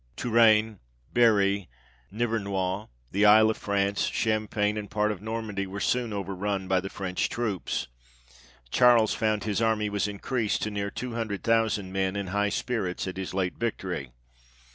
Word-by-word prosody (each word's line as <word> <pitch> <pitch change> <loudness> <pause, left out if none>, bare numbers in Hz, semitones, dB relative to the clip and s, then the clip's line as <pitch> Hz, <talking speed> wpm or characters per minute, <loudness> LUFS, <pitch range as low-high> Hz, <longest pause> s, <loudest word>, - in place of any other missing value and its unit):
Touraine, 110 -3 +4 0.3
Berry, 100 -5 +3 0.4
Nivernois, 100 -3 -1 0.2
the 100 +2 +1
Isle 110 +1 +7
of - - -5
France, 100 0 0
Cham 110 -1 0
pagne, 105 0 0
and 105 - -7
part 105 0 +1
of 100 -3 -6
Normandy, 110 -3 -3
were 100 +2 -6
soon 125 0 0
over 100 -1 -3
run 95 0 -2
by 95 0 +2
the 95 +1 -5
French 95 -3 -2
troops; 110 - -2 0.9
Charles 120 - +5
found 110 -1 0
his 105 +1 -1
army 110 -2 +1
was 100 0 0
in 105 -1 -6
creased 115 0 -1
to 105 - -2
near 100 0 -2
two 125 +4 -5
hundred 110 -4 -3
thousand 110 -4 +1
men, 95 0 0
in 100 -2 -3
high 105 0 +2
spirits 100 -5 -2
at 95 - -5
his 95 -1 -5
late 95 -2 -1
victory. 95 - -3
105 Hz, 165 wpm, -27 LUFS, 100-110 Hz, 0.9 s, Isle